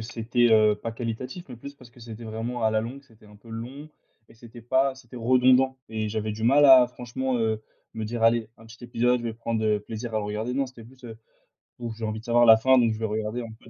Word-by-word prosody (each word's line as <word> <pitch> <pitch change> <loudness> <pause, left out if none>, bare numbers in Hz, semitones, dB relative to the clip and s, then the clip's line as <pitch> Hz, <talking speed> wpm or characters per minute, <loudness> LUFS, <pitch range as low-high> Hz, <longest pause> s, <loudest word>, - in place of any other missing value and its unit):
c'était, 115 +2 0
heu, 110 -1 +5
pas 115 +2 -6
qualitatif, 120 +8 -6
mais 125 - -8
plus 140 +4 -10
parce 125 -3 -17
que 120 - -19
c'était 115 0 -10
vraiment 115 +2 -5
à 110 - +3
la 110 - +2
longue, 125 +5 -7
c'était 110 -4 -22
un 105 0 -16
peu 115 +3 -19
long 125 +7 -8 0.4
et - - -19
c'était 115 +1 -14
pas, 130 +3 +1
c'était 125 -1 -16
redondant, 130 +2 +3
et 110 -1 -3
j'avais 110 0 -3
du 110 +1 -7
mal 140 +5 +5
à 130 -2 +8
franchement, 125 +1 -4
heu, 110 -1 -1 0.3
me 110 -1 -4
dire: 115 +1 -4
«Allez 115 -1 +3
un 115 - -16
petit 120 +2 -15
épisode, 120 +1 +1
je - - -8
vais 115 - -3
prendre, 115 -1 -3
heu, 105 -1 +2
plaisir 110 +2 -7
à - - +2
le 105 - -4
regarder». 110 +4 -3
Non, 135 0 0
c'était 125 -3 -14
plus, 130 +2 -18
heu: 115 -2 -9 0.6
«Bon, 120 -1 -5
j'ai 110 0 -6
envie 110 0 -3
de - - -20
savoir 120 0 +4
la 110 -1 +8
fin, 130 +3 +4
donc 115 -2 +3
je - - -6
vais 110 - -2
regarder 110 +2 -3
un 115 -2 -8
peu - - -18
115 Hz, 265 wpm, -25 LUFS, 110-125 Hz, 0.6 s, à